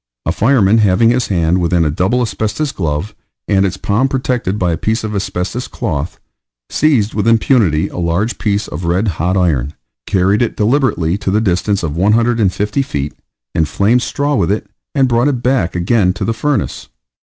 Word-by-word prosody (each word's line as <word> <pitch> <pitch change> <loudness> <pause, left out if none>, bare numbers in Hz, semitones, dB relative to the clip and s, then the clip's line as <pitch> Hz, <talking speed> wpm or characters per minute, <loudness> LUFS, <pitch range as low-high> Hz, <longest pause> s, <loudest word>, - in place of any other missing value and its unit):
A - - +1
fireman 115 -3 +3
having 105 +2 +4
his 125 0 0
hand 85 -1 +1
within 85 -1 +2
a 75 - +1
double 95 +11 +1
asbestos 110 +7 -2
glove, 80 +3 -3 0.3
and 95 0 +3
its 95 0 -5
palm 105 +8 +1
protected 125 -7 -1
by 90 -3 0
a - - 0
piece 110 +5 -1
of 110 -1 -4
asbestos 95 +4 -3
cloth, 80 - -4 0.5
seized 125 -9 +2
with 105 +1 -1
impunity 110 - +3
a - - -7
large 90 +7 -1
piece 105 -2 -1
of 85 +4 -6
red 90 +6 +1
hot 90 +1 0
iron, 75 -6 0 0.3
carried 100 +2 +2
it 120 - -1
deliberately 105 - +1
to 100 - -2
the 105 +3 +2
distance 100 -1 0
of 75 -2 -3
150 105 +3 +1
feet, 75 - -3 0.4
inflamed 100 +9 +2
straw 145 +3 -1
with 95 -9 +1
it, 105 - -1 0.3
and 135 -2 +3
brought 120 +2 +2
it 130 -4 -1
back 125 -10 +1
again 90 +1 +2
to 100 0 -4
the 115 - 0
furnace. 130 0 -2
100 Hz, 175 wpm, -15 LUFS, 90-120 Hz, 0.5 s, having